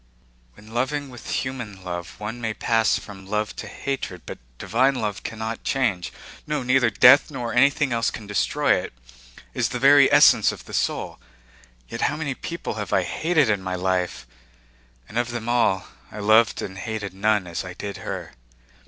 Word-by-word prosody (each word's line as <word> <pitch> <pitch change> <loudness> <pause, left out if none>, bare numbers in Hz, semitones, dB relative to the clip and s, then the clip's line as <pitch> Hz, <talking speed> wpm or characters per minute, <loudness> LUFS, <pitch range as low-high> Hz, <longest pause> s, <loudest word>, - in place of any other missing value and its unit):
"When 110 +2 -15
loving 135 +3 -1
with 120 - -10
human 115 -7 -4
love 85 -1 -6
one 110 +3 -5
may 110 -2 -2
pass 115 -1 +2
from 95 -2 -11
love 105 +1 -2
to - - -6
hatred, 130 -10 -5
but - - -8 0.2
divine 130 - +2
love 105 -5 -3
cannot 110 +1 -5
change. 105 -11 0 0.4
No, 150 -3 -1
neither 125 -1 +3
death 125 +8 +6
nor 125 -5 -4
anything 140 +1 +3
else 115 0 +1
can 110 - -8
destroy 105 -1 +1
it. - - -7 0.6
It - - -7
is - - +2
the - - -3
very - - +6
essence - - +6
of - - -11
the - - -12
soul. - - -2 0.7
Yet - - -6
how 145 - +1
many 145 -3 -2
people 170 +3 -5
have 100 - -6
I 95 - +3
hated 155 - +1
in 105 -3 +1
my 95 0 -3
life? 90 -7 -1 0.8
And 115 - -2
of 120 0 -1
them 120 -1 -5
all, 120 -6 +2 0.3
I - - -10
loved 110 +2 +3
and 95 0 -7
hated 105 -2 -5
none 105 0 +1
as 85 -1 -4
I 90 -1 -8
did 100 -1 -6
her." - - -6
110 Hz, 180 wpm, -23 LUFS, 100-125 Hz, 0.8 s, death